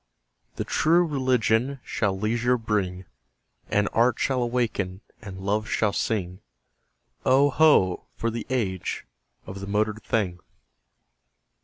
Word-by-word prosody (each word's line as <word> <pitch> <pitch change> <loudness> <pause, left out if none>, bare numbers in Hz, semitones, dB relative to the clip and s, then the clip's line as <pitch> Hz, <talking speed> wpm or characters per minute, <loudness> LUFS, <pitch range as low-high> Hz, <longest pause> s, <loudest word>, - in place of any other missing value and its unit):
The - - -2
True 170 +3 +3
Religion 130 -2 +1
shall 100 -3 -1
leisure 120 +4 +1
bring; 100 -5 -2 0.6
And 105 0 +2
Art 120 +1 +3
shall 130 -2 0
awaken 115 -6 -1 0.2
and 100 -3 -8
Love 105 +3 -1
shall 105 -2 +1
sing: 95 -5 -2 0.8
Oh, 140 +2 +4
ho! 125 - +4
for 115 - -2
the 115 - -5
age 100 -9 -2 0.4
of 95 +1 -8
the 100 - -7
motored 105 +2 0
thing! 95 -7 -1
110 Hz, 120 wpm, -25 LUFS, 100-125 Hz, 0.8 s, Oh